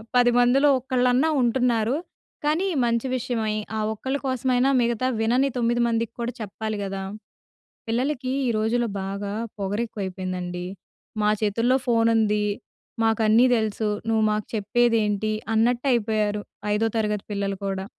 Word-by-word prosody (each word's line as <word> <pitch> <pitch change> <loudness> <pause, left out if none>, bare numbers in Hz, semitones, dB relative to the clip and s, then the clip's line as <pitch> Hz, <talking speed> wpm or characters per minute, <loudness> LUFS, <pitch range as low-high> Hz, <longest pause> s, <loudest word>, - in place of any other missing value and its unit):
10 245 -1 +5
మందిలో 270 +4 +4
ఒక్కళ్ళన్నా 255 +3 +2
ఉంటున్నారు. 240 0 +2 0.5
కానీ 320 +6 +1 0.2
మంచి 235 +2 0
విషయమై, 225 -4 -1 0.2
ఆ - - -1
ఒక్కళ్ళ 265 +6 -3
కోసమైనా 255 0 +1
మిగతా 235 +1 0
వినని 245 +5 +2
తొమ్మిది 240 0 +1
మందికి 230 -1 -1
కూడా 235 +1 -2
చెప్పాలి 215 +1 -4
గదా. 195 0 -4 0.9
పిల్లలకి 255 +2 -1 0.2
ఈరోజుల్లో 230 +2 +1
బాగా 200 +1 -4 0.3
పొగరు 205 +3 -1
ఎక్కువైపోయిందండి. 185 -3 -5 0.6
మా 210 - +3
చేతుల్లో 230 +5 +2
ఫోన్ 230 -1 +3
ఉంది. 210 -1 +2 0.6
మాకు 225 0 +2
అన్నీ 220 +3 +5
దెలుసు. 220 -1 -1 0.2
నువ్వు 220 -1 +2
మాకు 210 0 -1
చెప్పేది 230 +3 +2
ఏంటి? 210 +1 -1 0.2
అన్నట్టు 240 +4 +2
అయిపోయారు 215 -3 0 0.3
ఐదో 220 +2 +1
తరగతి 210 -2 -1
పిల్లలు 200 -1 -2
కూడా. 190 0 -2
225 Hz, 130 wpm, -24 LUFS, 210-245 Hz, 0.9 s, 10